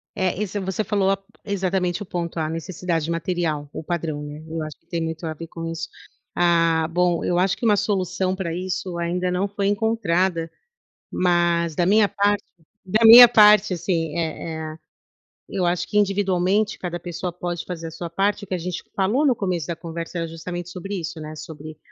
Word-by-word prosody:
É, 190 -2 0
isso, 205 0 -3
você 190 +2 -2
falou 195 -1 +1 0.3
exatamente 190 -2 -1
o - - -8
ponto, 170 -1 -4
a 155 -1 0
necessidade 165 0 -3
material, 165 -4 -2
o - - -6
padrão, 160 -3 -3
né, 150 +1 -8
eu 160 0 -4
acho 155 -1 -7
que - - -41
tem 170 0 -3
muito 160 +1 -4
a 160 - -2
ver 165 +2 -8
com 165 0 -7
isso. 165 0 -4 0.5
Ah, 165 -2 +3
bom, 175 0 +1
eu 175 - +1
acho 190 +1 +2
que - - -6
uma 210 -2 +4
solução 185 -2 0
pra 170 -4 -3
isso 180 0 -3
ainda 180 +1 -1
não 180 +3 0
foi 200 0 -1
encontrada, 190 -6 0 0.6
mas, 175 -2 +2
da 175 - +2
minha 205 +2 +4
parte 205 0 +1 0.4
da 215 +5 +1
minha 240 +2 +12
parte, 210 -3 +6
assim, 165 -3 -2
eh 160 -1 -4
eh, - - -12 0.7
eu 185 - -1
acho 175 0 0
que, 210 - -1
individualmente, 200 0 +1
cada 175 -1 -4
pessoa 175 +1 -4
pode 175 -1 -4
fazer 170 -2 -6
a - - -7
sua 170 +1 -6
parte. 200 +4 0
O - - -8
que 190 - -4
a - - -1
gente 180 +1 -5
falou 210 +10 +2
no 270 - +5
começo 180 -7 -2
da 170 - -3
conversa 170 +1 -6
era 165 -1 -2
justamente 175 +2 -6
sobre 195 +2 -5
isso, 165 -1 -6
né, 155 0 -7
sobre 155 0 -9
175 Hz, 195 wpm, -23 LUFS, 165-195 Hz, 0.7 s, minha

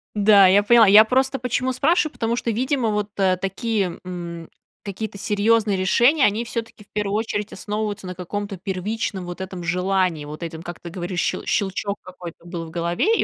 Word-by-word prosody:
Да, 205 -2 +6
я 195 +2 +5
поняла. 230 0 +6
Я 210 +3 +8
просто 265 +3 +1
почему 250 +1 -1
спрашиваю? 310 +4 +2
Потому 230 0 -1
что, 235 -1 -2
видимо, 255 0 0
вот, 210 0 -1
э, 185 -2 +2
такие, 195 0 -2
м, 170 -2 -7 0.3
какие-то 200 +1 -5
серьёзные 210 -1 +2
решения, 240 +10 +4
они 215 +3 +1
всё-таки 230 -2 -6
в - - -31
первую 205 -1 -2
очередь 215 -1 -2
основываются 210 -2 -4
на 180 - -6
каком-то 200 +2 -5
первичном 190 +1 -3
вот 175 0 -7
этом 185 -2 -6
желании. 180 -2 0
Вот 150 +3 -9
этом, 165 0 -6
как 175 -1 -8
ты 170 - -8
говоришь, 180 0 -4
ще - - -2
щелчок 200 +1 -1
какой-то 175 -2 -11
был 170 -1 -6
в 160 - -11
голове, 175 - +1
и - - +2
200 Hz, 185 wpm, -22 LUFS, 180-225 Hz, 0.3 s, Я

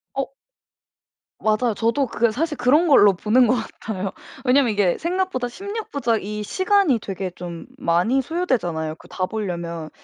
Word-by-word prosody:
어 275 0 -3 1.1
맞아요. 220 +1 +1
저도 235 +6 +1
그 235 -1 +1
사실 300 +4 -2
그런 290 +8 +4
걸로 205 -9 +7
보는 220 +7 +3
것 250 - +3
같아요. 210 -4 -4 0.3
왜냐면 255 -1 +4
이게 200 -4 +2
생각보다 350 -7 -1
16 405 - -6
부작 235 -7 0
이 210 +1 -4
시간이 375 - +2
되게 190 -2 -5
좀 175 -1 -8
많이 180 +11 +2
소요되잖아요, 215 - -1
그 - - -17
다 185 - -2
보려면. 170 -6 -4
230 Hz, 300 characters per minute, -22 LUFS, 190-280 Hz, 1.1 s, 걸로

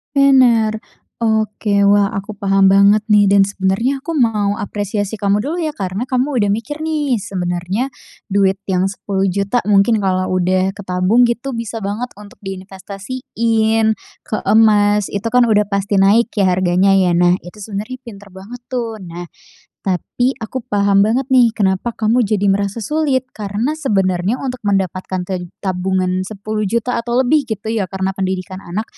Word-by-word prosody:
Bener. 245 -6 +4 0.4
Oke. 215 -2 0
Wah, 205 0 +3
aku 200 +1 -5
paham 195 -1 +3
banget 200 +2 +5
nih 210 -1 +5
dan 200 - +6
sebenernya 200 +7 0
aku 330 +5 -6
mau 215 -8 +1
apresiasi 205 +1 -3
kamu 205 0 +1
dulu 300 +9 -3
ya, 315 -3 -2
karena 195 +2 -4
kamu 255 +1 -1
udah 205 -2 +2
mikir 295 +8 -5
nih, 295 -6 0
sebenernya 185 +4 -3 0.4
duit 195 -1 +2
yang 185 0 +1
Rp10.000.000 195 +2 -1
mungkin 205 +2 +3
kalau 185 -1 0
udah 185 +1 +1
ketabung 190 +4 +2
gitu, 240 +2 -2
bisa 230 0 -4
banget 210 +5 -4
untuk 205 -1 -13
diinvestasiin 220 +3 -1 0.3
ke 215 - -4
emas. 210 -2 +4
Itu 210 +3 -3
kan 250 -1 +5
udah 210 -1 +3
pasti 200 0 -1
naik 205 +5 +4
ya, 200 - +3
harganya 185 +1 +2
ya. 180 -3 +3
Nah 175 0 +4
itu 175 +4 -12
sebenernya 210 +4 -6
pinter 205 -3 -11
banget 195 +6 -10
tuh. 230 -4 -3
Nah, 175 -1 -8 0.6
tapi 245 +7 -1
aku 235 +3 -5
paham 200 -1 +3
banget 225 +6 +2
nih, 240 -3 +4
kenapa 200 +3 0
kamu 225 +3 +2
jadi 205 -3 +2
merasa 200 +2 -2
sulit. 300 -4 0
Karena 210 +6 -2
sebenarnya 195 - 0
untuk 255 -2 -5
mendapatkan 185 -2 -2
ted 180 -1 -5 0.2
tabungan 185 0 0
Rp10.000.000 215 +4 -2
atau 235 +1 -3
lebih 285 +1 +2
gitu 220 0 -4
ya, 205 -5 -1
karena 190 +1 -2
pendidikan 190 -1 -4
anak 195 +5 -4
205 Hz, 155 wpm, -17 LUFS, 190-230 Hz, 0.6 s, dan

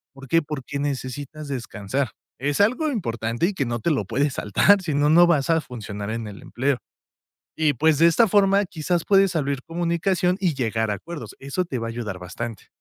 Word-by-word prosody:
¿Por 135 0 -11
qué? 165 +6 +3
Porque 145 -2 -5
necesitas 145 +2 -4
descansar. 125 -1 -3 0.3
Es 145 +5 -1
algo 255 +9 +2
importante 120 - -1
y 205 - -2
que 145 -8 -1
no 120 0 -2
te 165 - 0
lo 140 -8 +1
puedes 135 +7 0
saltar 195 - +4
si 160 -6 -2
no 155 +4 +6
vas 160 -3 +2
a 165 -1 +3
funcionar 105 -5 -7
en 115 0 -3
el 105 -1 -9
empleo. 130 +1 -1 0.8
Y 155 -2 +2
pues 155 -1 +3
de 165 - +6
esta 170 +8 +5
forma, 200 +1 +4
quizás 175 -1 -2
puedes 195 -3 +4
abrir 140 -3 -1
comunicación 175 +2 0
y 180 -5 +1
llegar 110 -4 -1
a 105 - +1
acuerdos. 170 - -8
Eso 140 +7 -2
te 130 -6 -3
va 115 0 -3
a - - -3
ayudar 115 -5 -5
bastante. 105 +4 -7
145 Hz, 195 wpm, -23 LUFS, 120-170 Hz, 0.8 s, no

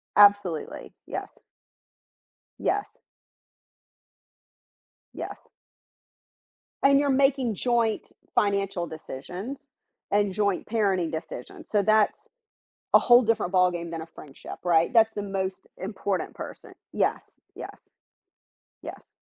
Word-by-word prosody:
Absolutely. 200 -6 +3
Yes. - - -5 1.3
Yes. 410 - -2 2.1
Yes. - - -8 1.3
And 275 0 +6
you're 285 -1 +1
making 270 -4 +2
joint 235 -1 0 0.2
financial 195 -4 +1
decisions 180 - -7 0.4
and 205 -1 +2
joint 200 -2 0
parenting 195 -7 +1
decisions. 160 -6 -7
So, 205 -2 +2
that's 215 0 +3 0.8
a - - +9
whole 240 0 +6
different 215 -5 0
ballgame 175 -2 +2
than 165 -1 -4
a - - -6
friendship, 145 -3 -11
right? 170 -2 +3
That's 225 -1 +5
the 205 - -3
most 195 -1 -3
important 195 -2 -3
person. - - -9 0.2
Yes. - - +1 0.3
Yes. - - -8 1.1
Yes. - - -9
200 Hz, 100 wpm, -26 LUFS, 180-225 Hz, 2.1 s, a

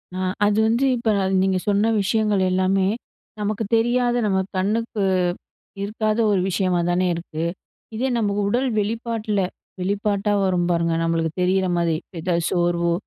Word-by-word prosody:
ஆ, - - -4 0.3
அது 205 0 +2
வந்து, 235 +4 +2
இப்ப 235 -2 0
அது 190 - 0
நீங்க 190 -1 +2
சொன்ன 205 +3 +2
விஷயங்கள் 210 0 +1
எல்லாமே 190 +1 +2 0.5
நமக்குத் 210 +1 -2
தெரியாத 240 +1 +1
நம்ம 190 -2 +1 0.2
கண்ணுக்கு 215 +3 -1 0.8
இருக்காத 215 +1 -1
ஒரு 200 - +2
விஷயமா 185 -1 +1
தானே 180 +1 +2
இருக்கு. 165 -1 -5 0.5
இதே 250 +4 0
நமக்கு 205 -2 0
உடல் 255 +5 +1
வெளிப்பாட்டுல, 220 -1 -1 0.4
வெளிப்பாட்டா 200 +2 0
வரும் 180 -2 +1
பாருங்க! 170 -1 +1
நம்மளுக்கு 165 -1 0
தெரியிறமாரி. 180 -3 +1 0.2
எத 170 +1 0
சோர்வோ! 175 -1 +1
200 Hz, 135 wpm, -22 LUFS, 180-220 Hz, 0.8 s, அது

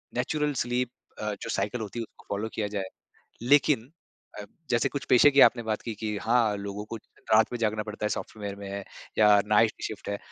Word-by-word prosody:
Natural 150 +4 0
sleep 125 0 -1 0.3
अ, 105 -1 -2
जो - - -5
cycle 110 +3 -1
होती 110 +2 -5
है - - -2
उसको - - -16
फ़ॉलो 110 +2 -3
किया 105 -2 -1
जाए। 100 -2 -4 0.5
लेकिन 140 -1 +3 0.5
अ, - - -7 0.3
जैसे 120 -1 +2
कुछ 140 -3 -4
पेशे 145 +4 +7
की 140 - +5
आपने 120 -1 +6
बात 110 -1 -2
की 115 - -4
कि 105 0 -3
हाँ, 115 -3 +2
लोगों 100 +1 -5
को 115 - -6 0.4
रात 110 +2 +5
में 120 - -3
जागना 110 -1 0
पड़ता 105 0 -6
है - - +1
सॉफ्टवेयर 100 -2 -5
में, 100 -1 -6 0.3
या 105 -1 +7
नाइट 105 +1 +4
शिफ्ट 110 - -6
है। 100 0 -2
110 Hz, 205 wpm, -27 LUFS, 105-120 Hz, 0.5 s, पेशे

